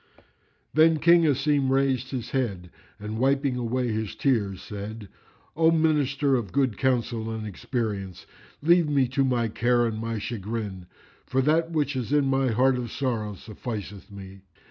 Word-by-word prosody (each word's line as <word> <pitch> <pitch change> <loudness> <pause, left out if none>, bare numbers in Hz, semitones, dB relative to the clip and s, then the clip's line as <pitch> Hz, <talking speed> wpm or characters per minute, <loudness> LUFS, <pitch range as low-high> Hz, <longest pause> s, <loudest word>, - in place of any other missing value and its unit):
Then 160 +1 +5
King 170 +1 +5
Asim 140 -1 +2
raised 135 -1 +1
his 125 -3 -5
head 100 -10 -2 0.3
and, 105 +2 -5
wiping 135 0 +2
away 125 +1 -1
his 110 -2 -3
tears, 105 -9 0
said, 105 +1 -8 0.5
"O 160 +1 +4
Minister 145 -4 +2
of 115 -7 -2
good 135 -6 +1
counsel 120 -2 0
and 110 -1 -4
experience, 100 -3 -4 0.4
leave 170 0 +4
me 140 -3 +2
to 135 +1 +1
my 125 -3 +1
care 120 +2 +1
and 110 -2 -2
my 115 0 -3
chagrin, 105 -3 -5 0.4
for 130 - 0
that 160 +3 +2
which 150 -4 -1
is 125 -1 -3
in 145 -1 +3
my 135 0 +2
heart 130 +3 +3
of 120 -3 -5
sorrow 115 -6 -2
sufficeth 105 -2 -7
me." 95 -1 -11
125 Hz, 155 wpm, -26 LUFS, 110-140 Hz, 0.5 s, Then